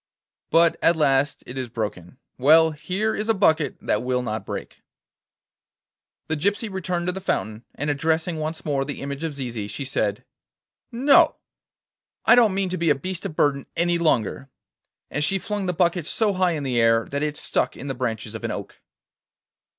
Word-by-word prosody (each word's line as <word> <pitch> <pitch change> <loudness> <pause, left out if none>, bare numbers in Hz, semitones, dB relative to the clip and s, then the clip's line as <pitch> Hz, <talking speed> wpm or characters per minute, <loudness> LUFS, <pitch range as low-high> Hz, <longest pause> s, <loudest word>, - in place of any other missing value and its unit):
'But 165 +1 +4
at 170 - +4
last 140 -2 +1
it 130 +2 -6
is 125 -2 -4
broken. 105 -2 -5 0.2
Well, 160 +4 +6
here 190 +8 -2
is 215 +2 -3
a 225 - +4
bucket 160 -6 +2
that 105 - 0
will 125 0 -1
not 110 -4 -4
break.' - - -7 1.5
The 160 - 0
gypsy 200 +7 -1
returned 180 -2 -2
to 180 - +1
the 190 +1 -6
fountain, 110 - -2
and 145 0 -1
addressing 160 +3 0
once 155 +1 -4
more 140 -3 0
the 145 +1 -5
image 140 +2 -5
of 160 -3 -3
Zizi, 120 -6 -4
she 140 +6 -6
said: 105 -6 -1 0.7
'No; 265 +5 +5 0.9
I - - +7
don't 230 -5 +5
mean 195 -1 0
to 185 - -3
be 170 -1 +2
a 145 - +5
beast 180 +6 -4
of 155 - -10
burden 140 -3 +1
any 170 0 +2
longer.' 135 -4 0 0.6
And 150 - -1
she 195 +6 +2
flung 200 0 -3
the - - +2
bucket 175 -1 +1
so 215 -3 +1
high 185 -2 +2
in 150 -3 -3
the 125 -3 0
air 115 0 +4
that 140 0 -2
it 150 0 -2
stuck - - 0
in 130 - -8
the 135 - -2
branches 115 -4 -3
of 110 - -7
an - - -2
oak. - - -7
150 Hz, 190 wpm, -23 LUFS, 130-180 Hz, 1.5 s, I